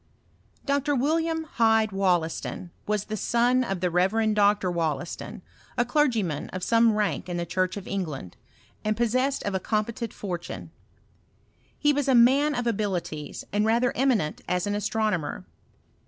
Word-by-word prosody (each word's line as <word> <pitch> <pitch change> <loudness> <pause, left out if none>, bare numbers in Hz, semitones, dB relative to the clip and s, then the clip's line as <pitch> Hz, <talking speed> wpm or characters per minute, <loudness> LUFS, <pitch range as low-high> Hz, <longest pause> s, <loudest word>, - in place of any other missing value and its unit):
Dr. 285 +1 +1
WiDiam 320 +4 +1
Hyde 220 -5 +2
Wollaston, 180 -2 -1 0.2
was 210 -1 0
the 215 - -4
son 240 +4 +2
of 195 -7 -3
the 180 -1 +1
Reverend 210 +5 +2
Dr. 205 -2 +3
Wollaston, 165 -2 -3 0.3
a 240 - +3
clergyman 235 - 0
of 185 -1 -6
some 230 +2 +4
rank 205 -3 -1
in 175 - -2
the 170 - -2
church 185 +2 -1
of 200 - -7
England, 155 - -4 0.5
and 215 0 0
possessed 255 +4 +1
of 200 - -2
a 190 - 0
com 215 +3 0
petent 230 0 -5
fortune. 175 -4 -6 1.1
He 295 0 +3
was 285 -1 0
a 265 - +4
man 275 +5 +5
of 245 -1 -2
abilities, 190 -9 -3
and 205 +1 +2
radier 235 +3 +2
eminent 240 - +1
as 180 -1 0
an 205 - -1
astronomer. 205 - -1
210 Hz, 155 wpm, -26 LUFS, 185-240 Hz, 1.1 s, man